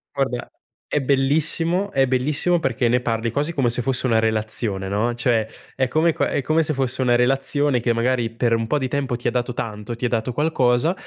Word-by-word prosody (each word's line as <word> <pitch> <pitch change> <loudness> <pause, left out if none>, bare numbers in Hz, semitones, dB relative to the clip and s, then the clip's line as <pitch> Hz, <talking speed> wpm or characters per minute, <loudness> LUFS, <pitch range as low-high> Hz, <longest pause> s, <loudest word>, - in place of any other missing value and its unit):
Guarda, 130 -3 -2 0.4
è 150 - +1
bellissimo 155 +7 0
è 135 0 +3
bellissimo 150 +7 +1
perché 120 -4 0
ne 125 +1 +3
parli 115 -1 -2
quasi 150 +7 -1
come 135 -6 +1
se 120 - 0
fosse 130 +1 +1
una 115 -2 +3
relazione, 110 -3 -1
no, 110 +5 0
cioè, 120 -2 +1 0.3
è 130 -1 0
come 160 +5 +2
qua - - 0
è - - -1
come 155 +4 +2
se 155 0 0
fosse 130 -1 -2
una 125 -2 +3
relazione 135 +2 +1
che 120 0 +1
magari 120 0 0
per 115 +1 0
un 115 0 0
po' 150 - +1
di 130 -2 -2
tempo 135 -2 -1
ti 120 0 -1
ha - - -4
dato 125 +1 -2
tanto, 110 0 -5
ti 120 - -12
ha 125 - +2
dato 115 +1 -1
qualcosa, 145 0 +2
125 Hz, 215 wpm, -22 LUFS, 115-140 Hz, 0.4 s, è